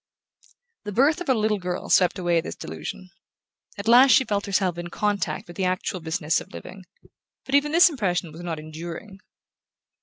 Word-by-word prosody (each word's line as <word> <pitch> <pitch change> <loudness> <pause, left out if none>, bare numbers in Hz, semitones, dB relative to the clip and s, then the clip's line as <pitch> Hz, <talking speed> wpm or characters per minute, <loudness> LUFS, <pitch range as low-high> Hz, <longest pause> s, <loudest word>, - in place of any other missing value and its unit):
The 210 - -4
birth 285 - +2
of 355 - -5
her 260 - +3
little 215 -1 0
girl 180 -1 -4
swept 180 -2 +4
away 175 -2 +1
this - - -7
delusion. 80 - -8 0.7
At 200 +2 -6
last 250 +4 +7
she 265 - +5
felt 205 -3 -2
herself 190 -3 0
in 175 - -5
contact 205 +2 -2
with 175 - -12
the 190 - 0
actual 185 +1 -2
business 160 -1 -1
of - - -13
living: 185 - -10 0.6
but 270 - -7
even 285 +1 +3
this 340 +3 +7
impression 185 - -1
was 160 +3 -10
not 170 -2 -4
enduring. 165 +6 -8
185 Hz, 180 wpm, -24 LUFS, 175-220 Hz, 0.7 s, last